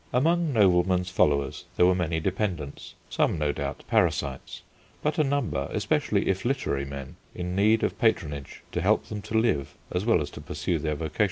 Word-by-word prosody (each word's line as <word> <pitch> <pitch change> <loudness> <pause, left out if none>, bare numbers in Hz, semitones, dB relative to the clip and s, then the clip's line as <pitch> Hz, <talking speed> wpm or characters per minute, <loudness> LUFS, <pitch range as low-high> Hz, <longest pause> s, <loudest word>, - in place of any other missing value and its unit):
Among 165 +5 +2
noblemen's 90 -4 +3
followers 70 -6 +1
there 90 - +6
were 90 - +5
many 85 -3 0
dependents, 80 -5 -3
some, - - +1
no 75 -1 +1
doubt, - - -4
parasites, 70 -2 0 0.4
but 150 +1 0
a - - +5
number, 135 - -1
especially - - 0
if 95 0 0
literary 120 - -1
men, 70 -1 -8 0.2
in 90 0 -3
need 110 +3 +3
of - - -1
patronage 75 - -1
to - - -1
help - - +2
them 105 -1 -4
to 110 - -2
live 70 - 0 0.2
as 90 +1 -1
well 115 +1 +4
as 75 -1 -4
to - - -9
pursue 75 +3 -2
their 75 0 -1
vocation. 80 +1 -6
90 Hz, 180 wpm, -27 LUFS, 75-110 Hz, 0.4 s, there